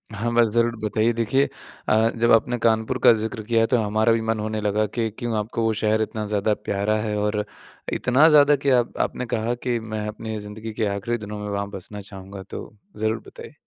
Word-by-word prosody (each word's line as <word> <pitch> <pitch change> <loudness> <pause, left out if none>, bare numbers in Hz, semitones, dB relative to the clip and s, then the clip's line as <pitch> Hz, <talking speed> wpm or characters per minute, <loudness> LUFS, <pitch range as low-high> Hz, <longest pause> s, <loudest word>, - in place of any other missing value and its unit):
हाँ, 115 +3 -2
बस 120 -1 +5
ज़रूर 120 0 +2
बताइए 110 +2 +1
देखिए 115 +4 +1 0.4
अ, 110 +1 +4
जब 115 0 +2
आपने 120 +2 +3
कानपुर 115 +2 +1
का - - +9
ज़िक्र 110 0 -3
किया 115 +1 +2
तो - - +6
हमारा 110 +2 +2
भी 115 - +1
मन 115 -1 +1
होने 110 0 -2
लगा 105 +1 +1
कि 115 +2 -2
क्यों 120 -3 -2
आपको 110 +2 -2
वो 110 - +2
शहर 110 0 +2
इतना 110 0 -3
ज़्यादा 105 0 +1
प्यारा 105 +1 -1
है 105 -1 -2
और 105 0 0 0.5
इतना 130 +5 +4
ज़्यादा 145 -1 +6
कि 140 0 -1
आप 120 - -3
आपने 125 - -6
कहा 115 +2 -1
कि 120 -1 -2
मैं 110 -1 -5
अपनी 110 +1 -5
ज़िंदगी 105 +2 -7
के 110 - -1
आखिरी 120 +4 -2
दिनों 105 -1 -7
में 105 - -5
वहाँ 100 0 -2
बसना 105 +1 -8
चाहूँगा। 95 0 -10
तो 95 - -9 0.2
ज़रूर 110 +1 0
बताइए। - - -11
110 Hz, 210 wpm, -23 LUFS, 105-115 Hz, 0.5 s, का